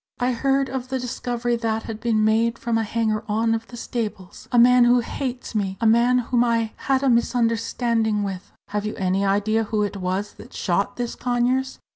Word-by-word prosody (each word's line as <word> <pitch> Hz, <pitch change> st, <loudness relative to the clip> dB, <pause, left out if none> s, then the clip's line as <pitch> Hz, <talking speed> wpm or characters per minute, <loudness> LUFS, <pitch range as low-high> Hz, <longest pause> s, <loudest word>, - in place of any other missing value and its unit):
"I 245 Hz, +1 st, +1 dB
heard 270 Hz, +2 st, +1 dB
of 255 Hz, -1 st, -4 dB
the 265 Hz, -, -1 dB
discovery 240 Hz, -1 st, -2 dB
that 225 Hz, -1 st, -1 dB
had 220 Hz, -1 st, -6 dB
been 225 Hz, -2 st, +1 dB
made 225 Hz, +2 st, +2 dB
from 235 Hz, -1 st, -2 dB
a 225 Hz, -, +2 dB
hanger 220 Hz, 0 st, -1 dB
on 225 Hz, +2 st, +1 dB
of 225 Hz, 0 st, -3 dB
the 240 Hz, -, -10 dB
stables, 215 Hz, -6 st, -5 dB
a 245 Hz, -, +2 dB
man 245 Hz, +1 st, +7 dB
who 245 Hz, 0 st, +4 dB
hates 250 Hz, +1 st, -5 dB
me 195 Hz, -3 st, -1 dB
a -, -, -1 dB
man 235 Hz, +3 st, +4 dB
whom 245 Hz, 0 st, +1 dB
I 230 Hz, -2 st, +1 dB
had 270 Hz, 0 st, 0 dB
a -, -, +2 dB
misunderstanding 230 Hz, -2 st, +1 dB
with." 195 Hz, -2 st, -5 dB, 0.2 s
"Have 205 Hz, 0 st, -2 dB
you 215 Hz, +1 st, -4 dB
any 190 Hz, +1 st, 0 dB
idea 205 Hz, +3 st, +1 dB
who 210 Hz, 0 st, 0 dB
it 205 Hz, -1 st, -3 dB
was 190 Hz, +2 st, -2 dB
that -, -, -12 dB
shot 195 Hz, +3 st, -1 dB
this 240 Hz, -1 st, -3 dB
Conyers?" 250 Hz, +2 st, 0 dB
230 Hz, 200 wpm, -23 LUFS, 215-245 Hz, 0.2 s, man